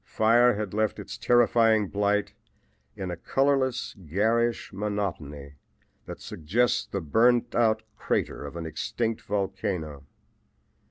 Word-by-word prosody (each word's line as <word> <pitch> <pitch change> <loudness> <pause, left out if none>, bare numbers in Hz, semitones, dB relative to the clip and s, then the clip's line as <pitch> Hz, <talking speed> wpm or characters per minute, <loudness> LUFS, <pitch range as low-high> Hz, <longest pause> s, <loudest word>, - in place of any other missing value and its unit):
Fire 120 +2 +4
had 105 -2 -4
left 110 0 0
its - - -7
terrifying 115 -3 +3
blight 105 +1 0 0.6
in 95 -2 -4
a - - -3
colorless, 135 +4 0
garish 110 +8 0
monotony 85 -9 -4 0.5
that - - -7
suggests 105 +9 0
the 100 - -3
burned 115 +9 +2
out 110 -2 +2
crater - - -2
of 70 +2 -8
an 85 -1 -5
extinct 110 +8 -3
volcano. 90 -7 -3
105 Hz, 115 wpm, -27 LUFS, 90-115 Hz, 0.6 s, Fire